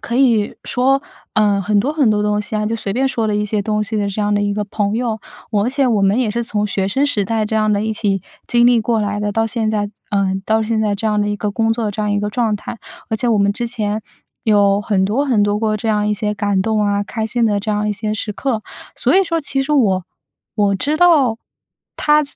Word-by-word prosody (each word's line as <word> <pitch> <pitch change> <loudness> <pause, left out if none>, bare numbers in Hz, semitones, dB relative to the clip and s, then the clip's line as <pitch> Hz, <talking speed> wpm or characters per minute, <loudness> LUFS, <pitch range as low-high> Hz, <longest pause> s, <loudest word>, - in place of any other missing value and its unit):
可 235 - -3
以 235 -6 +2
说， 270 +3 +1 0.3
呃， 205 -2 +3
很 205 +1 +1
多 275 +9 +1
很 290 -6 +2
多 210 0 +1
东 210 0 +1
西 210 +1 -4
啊， 210 - 0
就 225 - -1
随 200 -3 -3
便 265 +4 +1
说 230 -4 -1
了 210 - 0
一 210 - 0
些 210 0 -1
东 210 +1 0
西 220 +1 -3
的 205 -1 0
这 200 +2 -3
样 205 0 +1
的 205 - +2
一 205 0 0
个 210 0 -1
朋 205 0 -1
友。 225 -2 -1 0.3
我 205 -2 +1
而 - - +1
且 275 0 +1
我 225 -5 +2
们 195 +5 +3
也 240 -4 +1
是 235 +2 -1
从 210 -2 -1
学 195 -1 -1
生 270 +7 +1
时 210 -8 0
代， 220 +1 0
这 215 +1 -3
样 215 0 +2
的 205 0 +1
一 220 - -1
起 200 -3 -1 0.2
经 240 0 +4
历 240 -1 +5
过 225 0 0
来 205 0 -2
的 210 - -1
到 225 +1 +1
现 220 -1 -1
在 205 -1 -1 0.2
呃， 195 -2 +1
到 220 0 +2
现 220 0 0
在 210 -2 +1
这 220 +2 -3
样 210 -1 +1
的 205 - 0
一 205 - -1
个 210 0 -2
工 225 +1 +1
作 225 -2 -2
这 210 - -5
样 210 - 0
一 205 - +1
个 205 0 -2
状 220 -2 0
态。 230 - -8 0.3
而 220 - +1
且 240 - -1
我 225 - +3
们 200 0 +3
之 240 - -3
前， 215 -3 -2 0.4
有 205 -2 +4
很 200 -2 +1
多 235 +9 +1
很 225 -6 +3
多 205 0 +1
过 215 -1 0
这 220 +2 -3
样 210 -1 +1
一 210 - +1
些 210 0 -2
感 200 -2 0
动 220 0 0
啊、 205 0 +1
开 220 0 -3
心 235 +1 0
的 205 -2 +1
这 215 +1 -3
样 210 0 0
一 - - +1
些 210 +1 -3
时 210 0 -3
刻。 230 -2 -2 0.3
所 - - +2
以 390 - +6
说 335 -1 -1
其 270 -1 -1
实 300 - -2
我 195 -10 +2 0.5
我 205 -2 +2
知 295 +10 -1
道， 310 -10 +4 0.6
他 300 0 +3
215 Hz, 290 characters per minute, -18 LUFS, 205-230 Hz, 0.6 s, 以